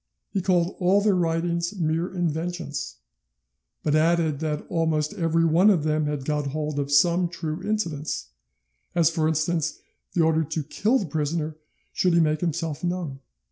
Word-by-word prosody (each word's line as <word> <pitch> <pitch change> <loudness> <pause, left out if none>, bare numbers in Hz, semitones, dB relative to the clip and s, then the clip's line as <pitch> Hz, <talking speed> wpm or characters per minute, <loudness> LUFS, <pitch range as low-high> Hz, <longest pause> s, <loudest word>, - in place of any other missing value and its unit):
He 195 - 0
called 180 -1 +1
all 185 +2 +4
their 205 -1 +3
writings 170 +1 0
mere 165 +2 0
inventions, 170 -2 -3 0.9
but 150 - +1
added 160 -1 +2
that 150 -2 -2
almost 155 -2 0
every 165 -1 +1
one 170 +6 +5
of 175 -7 +3
them 155 -1 +1
had 145 -3 -3
got 150 -1 -1
hold 150 +1 -2
of 140 0 -2
some 170 +4 +4
true 160 0 -4
incidents, 170 - -2 0.7
as 165 -2 +4
for 160 -1 +1
instance 160 +1 0 0.4
the 175 - +2
order 160 0 +3
to 160 0 -3
kill 210 - +1
the 210 - -2
prisoner 155 0 -2 0.4
should 180 -2 +2
he - - +5
make 155 -1 +2
himself 165 -2 -2
known. 175 -6 -2
165 Hz, 160 wpm, -25 LUFS, 155-175 Hz, 0.9 s, one